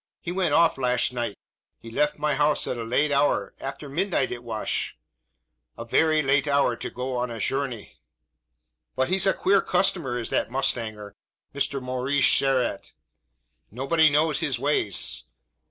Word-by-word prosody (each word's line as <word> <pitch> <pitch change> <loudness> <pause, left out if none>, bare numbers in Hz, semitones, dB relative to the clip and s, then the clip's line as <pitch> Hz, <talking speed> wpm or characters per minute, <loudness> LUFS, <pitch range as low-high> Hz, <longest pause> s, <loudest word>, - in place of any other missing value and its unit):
He 175 - -5
went 185 0 +1
off 165 -4 +4
lasht 125 -1 +1
night. 120 -4 -3 0.4
He 115 - -12
left 150 +5 +1
my 150 0 0
housh 150 +1 +2
at - - -2
a 115 - -4
late 135 +6 +1
hour 140 +1 +1
after 140 +2 -6
midnight 160 -1 0
it 120 0 -6
wash 110 -2 -3 0.8
a 115 - -6
very 155 +5 +3
late 140 +1 +2
hour, 140 -4 +2
to - - -5
go 125 0 -3
a - - -1
shourney! 125 0 -3 1.0
But 130 +3 0
he's 190 +1 +2
a 195 - +4
queer 195 +1 +3
cushtomer 175 -9 0
is 115 - -5
that - - 0
mushtanger, 110 -5 -2 0.4
Mister 140 0 -1
Maurish 130 +2 -1
Sherralt. 135 -3 0 0.8
Nobody 155 +7 +3
knows 150 0 +2
his 145 -7 -1
ways. 130 -7 0
135 Hz, 155 wpm, -25 LUFS, 125-150 Hz, 1.0 s, off